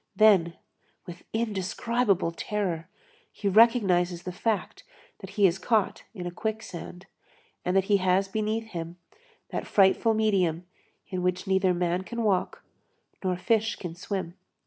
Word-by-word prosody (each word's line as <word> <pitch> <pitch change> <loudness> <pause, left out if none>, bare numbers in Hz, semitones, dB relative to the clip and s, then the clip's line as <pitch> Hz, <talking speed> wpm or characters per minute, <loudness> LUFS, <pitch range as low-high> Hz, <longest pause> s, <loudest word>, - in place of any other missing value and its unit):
Then, 190 -6 +5 0.5
with 175 0 -10
indescribable 220 -2 0
terror, 180 -2 -3 0.4
he 205 - -4
recognizes 190 -5 +4
the 180 - -4
fact 215 +3 -2 0.4
that 195 - -9
he 205 - +5
is 185 0 +3
caught 220 -3 0
in 180 -3 -6
a 175 - -3
quicksand, 190 -3 -6 0.6
and 180 +2 +1
that 190 - +4
he 200 +1 +3
has 185 +1 +2
beneath 220 +2 -2
him 170 0 -6 0.5
that - - -4
frightful 205 +3 +4
medium 185 -6 +1 0.4
in 185 -2 -3
which 180 +1 -1
neither 190 -1 +2
man 175 +1 0
can 235 +4 -4
walk 215 - 0 0.6
nor 185 -1 0
fish 220 +3 +1
can 175 -3 -7
swim. 185 0 -4
190 Hz, 140 wpm, -27 LUFS, 180-215 Hz, 0.6 s, Then